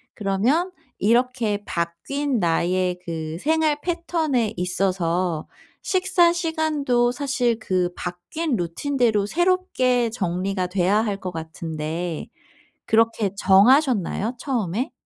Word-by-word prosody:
그러면 235 - +1 0.3
이렇게 230 -2 +1
바뀐 235 +11 -2
나의 180 +1 +1
그 160 -2 -4
생활 310 - +1
패턴에 320 - -1
있어서 180 -2 -1 0.4
식사 365 -2 +3
시간도 310 -8 +1
사실 250 -3 0
그 185 -5 0
바뀐 240 - -3
루틴대로 220 - 0
새롭게 260 - +1
정리가 185 -2 -2
돼야 185 +2 +1
할 205 -3 -2
것 185 - -5
같은데 160 0 -5 0.6
그렇게 225 -2 +2
정하셨나요, 225 - +3
처음에? 245 - -2
220 Hz, 225 characters per minute, -23 LUFS, 180-280 Hz, 0.6 s, 식사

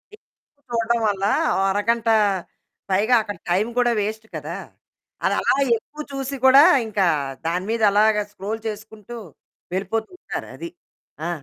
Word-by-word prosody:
ఎక్కువ 285 -8 -42
చూడడం 235 0 +1
వల్ల 195 -1 0 0.3
ఓ - - +1
అరగంట 230 +3 +1 0.8
పైగా 210 +6 +3
అక్కడ 205 -3 -6
టైం 190 +6 +2
కూడా 245 -1 +3
వేస్ట్ 220 +1 -4
కదా! - - -5 0.7
అది - - +2
అలా - - +2 0.2
ఎక్కువ 300 +7 -11
చూసి 275 0 -4
కూడా 270 +2 +9 0.2
ఇంకా 205 -3 +1 0.4
దాని 180 +3 -1
మీద 230 0 -1
అలాగా 210 +1 +4
స్క్రోల్ 210 +2 -5
చేసుకుంటూ 215 +2 -8 0.6
వెళ్ళిపోతూ 200 +4 -2
ఉంటారు - - -6
అది. 340 - -7 0.6
ఆ! - - -2
220 Hz, 135 wpm, -22 LUFS, 205-235 Hz, 0.8 s, కూడా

